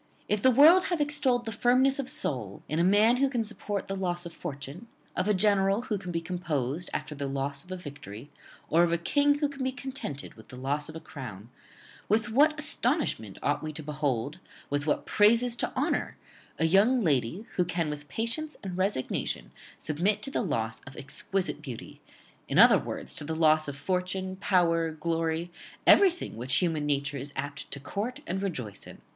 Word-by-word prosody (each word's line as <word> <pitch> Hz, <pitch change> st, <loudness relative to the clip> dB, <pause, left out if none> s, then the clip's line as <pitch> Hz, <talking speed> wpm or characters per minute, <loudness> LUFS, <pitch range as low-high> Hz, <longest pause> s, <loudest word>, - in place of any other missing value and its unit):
If 210 Hz, -1 st, 0 dB
the 260 Hz, -, +6 dB
world 315 Hz, +9 st, +7 dB
have 350 Hz, -3 st, -1 dB
extolled 290 Hz, -5 st, +1 dB
the 225 Hz, -, -3 dB
firmness 255 Hz, +5 st, +3 dB
of 265 Hz, -2 st, -2 dB
soul 110 Hz, -8 st, -2 dB
in 155 Hz, +3 st, -1 dB
a -, -, +4 dB
man 210 Hz, +6 st, +5 dB
who 275 Hz, +1 st, +2 dB
can 240 Hz, -4 st, -1 dB
support 210 Hz, -2 st, -4 dB
the 195 Hz, -, -3 dB
loss 175 Hz, -2 st, -2 dB
of 170 Hz, -, -7 dB
fortune; 145 Hz, -, -7 dB, 0.3 s
of 185 Hz, -, 0 dB
a 210 Hz, -, +4 dB
general 200 Hz, +2 st, +3 dB
who 210 Hz, -5 st, -2 dB
can 180 Hz, -2 st, -6 dB
be 165 Hz, -1 st, -1 dB
composed 165 Hz, -3 st, -2 dB
after -, -, -4 dB
the 140 Hz, -1 st, -4 dB
loss 140 Hz, +1 st, -3 dB
of 180 Hz, -, -15 dB
a 185 Hz, -, -3 dB
victory; 140 Hz, -, -9 dB, 0.4 s
or 165 Hz, -, +4 dB
of 175 Hz, -1 st, +3 dB
a 170 Hz, -, +2 dB
king 285 Hz, -, +3 dB
who 290 Hz, 0 st, +1 dB
can 280 Hz, -2 st, -6 dB
be 260 Hz, -, 0 dB
contented 255 Hz, -, -6 dB
with 110 Hz, -1 st, -16 dB
the -, -, -10 dB
loss 140 Hz, +4 st, -2 dB
of 155 Hz, -, -9 dB
a -, -, -5 dB
crown; 125 Hz, -8 st, -9 dB, 0.6 s
with 220 Hz, +3 st, +2 dB
what 300 Hz, +7 st, +4 dB
astonishment 265 Hz, -, 0 dB
ought 145 Hz, -, +1 dB
we 155 Hz, -, -4 dB
to 155 Hz, -, -7 dB
behold, 145 Hz, -3 st, -2 dB, 0.3 s
with 145 Hz, +1 st, -1 dB
what 150 Hz, -, 0 dB
praises 230 Hz, +3 st, +4 dB
to -, -, -1 dB
honour, -, -, -1 dB, 0.4 s
a 160 Hz, -, +2 dB
young 205 Hz, +9 st, +4 dB
lady, 150 Hz, -, 0 dB
who 180 Hz, -, +3 dB
can 170 Hz, -2 st, -1 dB
with 145 Hz, -1 st, -8 dB
patience 230 Hz, -, -3 dB
and 185 Hz, -2 st, -5 dB
resignation 130 Hz, -, -2 dB, 0.3 s
submit 190 Hz, +7 st, 0 dB
to 275 Hz, -, -2 dB
the -, -, 0 dB
loss 110 Hz, -, -2 dB
of 130 Hz, -, -11 dB
exquisite 190 Hz, +7 st, -2 dB
beauty, 125 Hz, -5 st, -9 dB, 0.5 s
in -, -, -1 dB
other -, -, +8 dB
words -, -, -5 dB
to -, -, -5 dB
the 160 Hz, +2 st, -3 dB
loss 155 Hz, -1 st, +4 dB
of 140 Hz, -1 st, -5 dB
fortune, 185 Hz, +4 st, -2 dB
power, 170 Hz, -4 st, +2 dB
glory, 165 Hz, +1 st, -2 dB, 0.3 s
everything 360 Hz, -, +5 dB
which 130 Hz, +3 st, 0 dB
human 160 Hz, -3 st, +1 dB
nature 140 Hz, 0 st, 0 dB
is 140 Hz, +2 st, -7 dB
apt 140 Hz, +1 st, -5 dB
to 140 Hz, -, -5 dB
court 205 Hz, -, -4 dB
and 190 Hz, +3 st, -2 dB
rejoice 125 Hz, -, -4 dB
in! -, -, -11 dB
175 Hz, 195 wpm, -28 LUFS, 145-220 Hz, 0.6 s, other